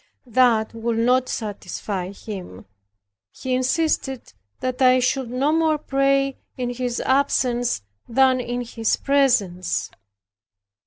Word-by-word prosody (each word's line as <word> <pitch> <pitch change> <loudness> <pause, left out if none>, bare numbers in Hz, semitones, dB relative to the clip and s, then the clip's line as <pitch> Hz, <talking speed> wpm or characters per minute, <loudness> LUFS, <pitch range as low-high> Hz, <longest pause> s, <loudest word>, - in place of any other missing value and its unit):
That 235 -3 +3
would 230 0 -2
not 250 +2 +2
satisfy 195 -3 -4
him; 190 - -9 0.7
he 260 - -4
insisted 265 - 0 0.3
that 255 0 -3
I 255 0 +6
should 255 0 0
no 265 +4 +1
more 320 -1 +2
pray 275 -1 +1 0.2
in 245 -1 -2
his 245 -1 -3
absence 250 - +1 0.3
than 260 +1 +4
in 245 0 -3
his 230 -2 -1
presence. 240 -11 +1
250 Hz, 110 wpm, -22 LUFS, 230-265 Hz, 0.7 s, I